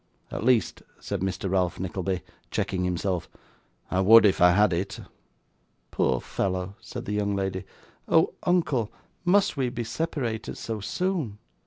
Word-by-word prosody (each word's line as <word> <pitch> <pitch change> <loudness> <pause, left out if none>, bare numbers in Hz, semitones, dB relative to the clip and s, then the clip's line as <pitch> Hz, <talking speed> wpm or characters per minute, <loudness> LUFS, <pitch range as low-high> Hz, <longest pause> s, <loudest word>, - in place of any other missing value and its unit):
At - - -4
least,' 115 -6 +2 0.2
said - - -3
Mr 95 +1 -2
Ralph 90 -2 0
Nickleby, 95 +1 -2 0.3
checking 90 -1 -1
himself, 90 -1 -1 0.6
'I 95 - +2
would 110 +3 +8
if 95 -3 +3
I 90 - +8
had 105 0 +4
it.' 95 +3 -2 0.9
'Poor 65 - +1
fellow!' 95 +4 -2
said - - -7
the - - -4
young 100 -1 0
lady. 95 -1 -2 0.4
'Oh! - - +4
uncle, 150 - +1 0.3
must 195 -3 +3
we 130 -2 +1
be 120 -1 -4
separated 120 -3 -3
so 110 -2 -4
soon! 155 - -2
100 Hz, 145 wpm, -26 LUFS, 95-120 Hz, 0.9 s, would